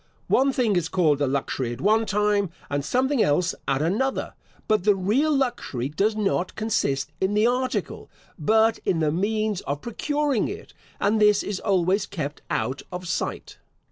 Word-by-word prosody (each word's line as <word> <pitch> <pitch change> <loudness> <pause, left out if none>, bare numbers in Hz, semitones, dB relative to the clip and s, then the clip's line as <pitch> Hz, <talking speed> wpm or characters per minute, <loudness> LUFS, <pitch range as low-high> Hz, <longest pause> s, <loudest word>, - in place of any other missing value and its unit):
One 275 +1 +4
thing 240 -6 +1
is 170 -2 0
called 155 -6 +2
a 145 - +2
luxury 130 -2 -2
at 120 - -9
one 220 +5 +2
time, 210 -2 +1 0.2
and 145 0 -1
something 260 - +1
else 165 +3 +2
at 135 +2 +1
another; 220 +11 -1 0.3
but 215 -4 +2
the 205 0 +4
real 220 +12 +1
luxury 240 - -1
does 200 +8 0
not 195 -3 -1
consist 150 -11 -1
in 190 +2 +1
the 210 +1 +4
article, 250 +1 -1 0.3
but 220 +7 +3
in 175 - +1
the 155 -2 +1
means 210 +3 -1
of 145 +1 -4
procuring 290 +1 -1
it, 420 +3 -8 0.3
and 210 +2 +2
this 210 -1 +5
is 205 -2 -3
always 190 0 +1
kept 155 -7 -5
out 135 +2 -1
of 180 0 -6
sight. 180 - -4
200 Hz, 170 wpm, -24 LUFS, 165-225 Hz, 0.3 s, this